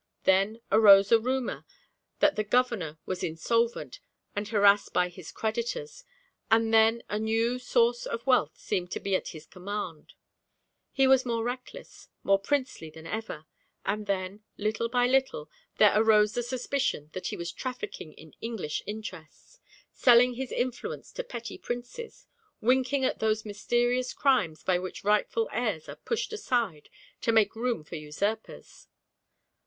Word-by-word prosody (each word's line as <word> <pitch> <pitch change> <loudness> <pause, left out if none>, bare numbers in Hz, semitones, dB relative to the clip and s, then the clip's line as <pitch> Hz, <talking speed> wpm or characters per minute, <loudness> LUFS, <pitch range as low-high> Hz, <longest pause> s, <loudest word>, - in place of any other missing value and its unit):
Then 195 +4 +2
arose 200 -2 +7
a 230 - +7
rumour 255 +2 -2 0.6
that 300 -1 +4
the 215 - 0
governor 215 -9 0
was 185 -1 -4
insolvent 230 - -1 0.4
and 205 0 -2
harassed 205 -1 +4
by 180 0 +2
his 175 -2 -11
creditors, 470 - -3 0.5
and 225 0 +3
then 225 +1 +5
a 210 - -2
new 225 +3 0
source 240 -1 +1
of 230 - -4
wealth 250 - +2
seemed 180 -1 -2
to - - -3
be 195 -1 0
at - - -2
his 155 -2 -9
command; 185 -4 -6 0.8
he 270 - +3
was 265 -1 +5
more 230 -3 -1
reckless, 250 +2 -7
more 195 0 +4
princely 255 - -2
than 160 +1 -13
ever; 210 -6 -5 0.4
and 210 +1 -2
then, 195 +1 -3
little 220 +2 -1
by 245 0 +2
little, 260 - 0 0.3
there 210 - +7
arose 215 -1 +4
the 240 - -1
suspicion 250 - -2
that 185 - -4
he - - -4
was 170 0 -4
trafficking 255 - -6
in 160 -1 -15
English 225 -10 -3
interests, 190 -7 -9 0.3
selling 245 0 +5
his 260 +1 -5
influence 245 0 -3
to - - -5
petty 235 - -7
princes, 245 - -7 0.3
winking 260 +3 +2
at - - -1
those 220 0 0
mysterious 240 +4 0
crimes 210 - +1
by 180 -1 +2
which 185 +2 -7
rightful 210 +2 +1
heirs 215 -9 -2
are - - -7
pushed 465 -1 -3
aside 235 - -1 0.3
to 230 - +2
make 220 -1 +3
room 230 -6 -1
for 160 +2 -7
usurpers. 200 +9 -5
220 Hz, 150 wpm, -28 LUFS, 195-245 Hz, 0.8 s, arose